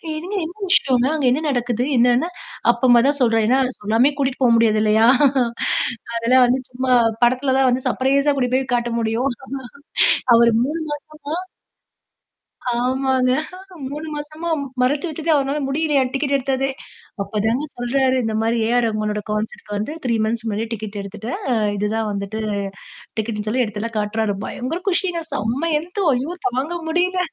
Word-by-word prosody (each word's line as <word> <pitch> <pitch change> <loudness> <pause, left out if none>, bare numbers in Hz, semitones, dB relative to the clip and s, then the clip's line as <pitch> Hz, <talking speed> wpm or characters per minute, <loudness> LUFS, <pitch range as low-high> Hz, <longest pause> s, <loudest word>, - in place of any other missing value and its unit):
"என்னங்க, 365 +6 -4
என்ன 350 +4 -9
விஷயங்க? 260 -9 +3
அங்க 290 - -1
என்ன 285 - +1
நடக்குது?" 245 -2 0
என்னன்னா, 245 +7 +3 0.4
அப்பதான் 240 0 +4
தான் 285 0 +1
சொல்றாரு. 225 -3 +3
ஏன்னா 260 +2 +4 0.2
சொல்லாமே 225 +7 +3
கூட்டிட்டு 270 -1 -1
போக 240 - +5
முடியாது 220 -2 +3
இல்லயா! 220 +1 +4 1.1
அதெல்லாம் 250 +2 +4
வந்து 255 +2 +1
சும்மா 255 0 0 0.3
படத்தில 255 +2 +2
தான் 265 - +4
வந்து 250 +1 -1
சர்ப்ரைஸா 275 +2 +2
கூட்டிட்டு 255 -2 0
போய் 260 -1 -2
காட்ட 240 0 -1
முடியும். 230 +5 0 1.1
அவரு 235 0 +6
3 305 +5 -2 0.3
மாசமா 305 +1 -5 1.4
ஆமாங்க. 255 +1 +1 0.6
3 300 +2 -5
மாசமா 305 +3 -5 0.3
மறைச்சு 280 +6 +1
வச்சதே, 320 +1 -5
அவருனால 280 +1 0
முடியலயாம், 280 -2 +1
டிக்கெட் 280 0 -1
எடுத்ததே. 270 0 -1 0.5
அப்பதாங்க 220 +7 -1
சொல்றாரு, 260 +2 +1
இந்த 220 - -1
மாரி 225 +1 +1
ஏ - - 0
ஆர் 245 - +3
ரகுமனோட 215 -1 -1
கான்செர்ட் 210 0 -4
வந்து 210 +7 -3
3 235 -3 +1
மந்த்ஸ் 225 +1 -1
முன்னாடியே 220 +1 -2
டிக்கெட் 215 -1 -6
எடுத்துட்டேன். 215 +4 -6
அ - - +3 0.2
இதுதான் 215 +2 -1
வந்துட்டு 200 +2 -4 0.8
டிக்கெட்ன்னு 215 -1 -2
சொல்லி, 250 +4 +1
எடுத்தத்தெல்லாம் 220 +1 -5
காட்டு்றாரு. 210 0 0
பயங்கர 265 +8 -4
குஷிங்க. 355 -2 0
செம்ம 250 +10 -1
என்து 360 +5 -4
ஐயோ! 260 +6 -2 0.2
தாங்க 265 +7 -2
முடியல. 360 +3 +1
250 Hz, 145 wpm, -21 LUFS, 225-280 Hz, 1.4 s, அவரு